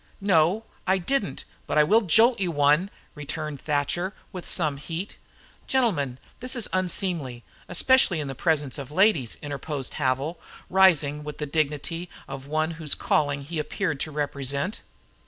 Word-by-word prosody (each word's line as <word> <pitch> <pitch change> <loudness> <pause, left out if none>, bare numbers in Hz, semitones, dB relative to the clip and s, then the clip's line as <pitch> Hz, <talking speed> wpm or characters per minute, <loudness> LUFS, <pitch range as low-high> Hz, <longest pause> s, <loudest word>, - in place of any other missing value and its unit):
"No, 195 +2 +3 0.2
I 190 +1 +4
didn't, 195 - -1 0.2
but 150 - 0
I 150 - +7
will 215 +9 +4
jolt 225 +5 +5
you 185 -2 +1
one," 150 +4 +3 0.2
returned 150 -1 -5
Thatcher, 150 +6 -1 0.2
with 180 -2 -7
some 155 -5 +1
heat. 165 +7 -6 0.5
"Gentlemen, 170 - +1 0.2
this 255 +1 -2
is 235 -4 0
unseemly, 175 - -1 0.3
especially 190 -1 +4
in 145 - -3
the 135 - -4
presence 145 -1 0
of 135 -2 -7
ladies," 160 - +2
interposed 145 -1 -4
Havil, 140 +5 0 0.3
rising 155 -6 +4
with 150 0 -7
the 150 - -3
dignity 155 +3 -2 0.2
of 135 0 -7
one 155 +2 0
whose 160 -3 -2
calling 145 -1 +1
he 160 +3 -4
appeared 155 0 -2
to 155 - -2
represent. 140 +3 -2
155 Hz, 150 wpm, -26 LUFS, 145-185 Hz, 0.5 s, I